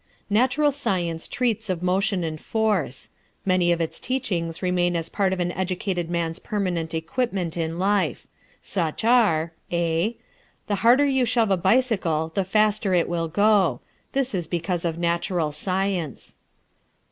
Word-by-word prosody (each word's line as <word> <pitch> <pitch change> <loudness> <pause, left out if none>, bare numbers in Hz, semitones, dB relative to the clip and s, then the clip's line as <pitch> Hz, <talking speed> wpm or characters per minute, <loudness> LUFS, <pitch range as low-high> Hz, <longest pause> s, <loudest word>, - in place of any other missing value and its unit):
Natural 260 +7 +3
Science 175 - -2
treats 225 -4 -1
of 180 -2 -2
motion 185 +1 +1
and 155 -1 -4
force. 210 - -1 0.3
Many 185 -2 +3
of 170 - +1
its 165 -1 -2
teachings 180 -11 -2
remain 175 -1 +1
as 165 -1 -2
part 195 -2 +1
of 190 - -2
an 175 0 0
educated 180 -1 -2
man's 170 -1 -2
permanent 180 -6 -2
equipment 180 0 -2
in 165 -1 -2
life. 195 +1 0 0.4
Such 170 -1 -2
are: 170 -10 +3 0.2
(a) 170 +5 0 0.5
The 205 - 0
harder 245 +5 +6
you 265 -2 +2
shove 225 -3 +2
a - - +5
bicycle 185 -6 +1
the 195 - +1
faster 210 0 +2
it 170 - +2
will 170 -1 -1
go. 195 - +3 0.3
This 270 -3 0
is 175 -4 -2
because 175 +1 -2
of 165 -1 -1
natural 170 -1 0
science. 185 - -2
180 Hz, 145 wpm, -24 LUFS, 170-210 Hz, 0.5 s, harder